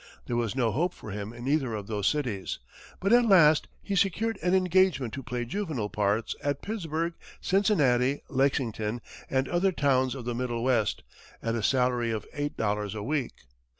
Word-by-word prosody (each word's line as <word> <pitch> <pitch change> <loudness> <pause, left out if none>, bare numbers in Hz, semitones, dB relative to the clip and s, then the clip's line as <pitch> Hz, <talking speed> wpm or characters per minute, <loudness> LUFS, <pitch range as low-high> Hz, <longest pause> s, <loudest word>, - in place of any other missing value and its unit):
There 120 - -2
was 120 -1 -1
no 120 -4 +2
hope 175 +8 0
for 110 - -9
him 100 +1 -5
in 120 +2 -8
either 135 -6 +1
of 105 -2 -5
those 105 -2 -1
cities; 120 -11 -1 0.4
but 195 +4 +2
at 240 -1 +6
last 160 -7 +6 0.2
he 200 - -2
secured 210 +4 +1
an 180 +1 +2
engagement 185 - +2
to 140 - -4
play 125 -2 -3
juvenile 145 - -3
parts 105 +2 0
at 145 0 -1
Pittsburgh, 170 -5 -2 0.3
Cincinnati, 145 - +2
Lexington, 120 -4 0 0.3
and 130 0 +1
other 180 +2 +2
towns 130 -5 +2
of 125 -3 -7
the 120 - -2
middle 120 -1 -2
west, 120 -5 +1 0.4
at 115 - 0
a 115 - -1
salary 125 0 +2
of 110 -2 -3
eight 145 0 -3
dollars 105 -1 -1
a 105 - -4
week. 140 +1 -3
130 Hz, 180 wpm, -28 LUFS, 115-165 Hz, 0.4 s, at